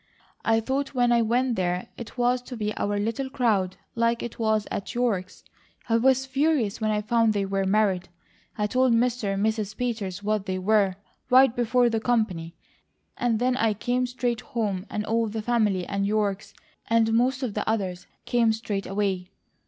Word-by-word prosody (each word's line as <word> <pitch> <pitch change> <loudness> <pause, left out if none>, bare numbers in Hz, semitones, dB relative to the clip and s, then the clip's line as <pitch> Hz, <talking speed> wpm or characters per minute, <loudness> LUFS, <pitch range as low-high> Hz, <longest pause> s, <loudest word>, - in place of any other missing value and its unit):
I 225 0 +3
thought 270 +4 -2
when 245 -1 +3
I 235 -1 +4
went 240 +2 +1
there 180 -1 -1
it 235 +1 -9
was 245 +1 +2
to 250 0 -8
be 210 -1 -2
our 205 0 -1
little 230 +6 -2
crowd 210 -8 0 0.2
like 230 0 +1
it 240 - -7
was 220 -2 +1
at 200 - -4
York's. 215 -7 -1 0.5
I 230 - +4
was 265 +2 +3
furious 265 -6 0
when 215 - +1
I 210 -1 0
found 225 0 +2
they 200 -1 0
were 195 0 -1
married. 190 -3 +1 0.5
I 210 - +1
told 255 +3 +2
Mr. 230 -4 +1
and 200 +2 0
Mrs. 215 -2 -2
Peters 205 -6 -3
what 210 -1 -1
they 185 0 -1
were, 195 0 +2 0.3
right 255 -1 +6
before 245 +1 +3
the 225 -1 0
company, 210 -8 -1 0.6
and 240 -2 +1
then 250 +2 +1
I 225 -4 +1
came 250 +4 0
straight 245 -2 -2
home 210 -4 -3
and 210 - -3
all 230 +1 +1
the 215 0 -4
family, 210 -6 +1
and 200 +1 -2
York's, 200 -2 -1 0.3
and 225 -1 +3
most 260 +4 +2
of 235 -5 -2
the - - -2
others, 190 -5 -2 0.2
came 235 -2 +3
straight 210 -3 -3
away. 195 -2 -1
220 Hz, 185 wpm, -26 LUFS, 200-245 Hz, 0.6 s, right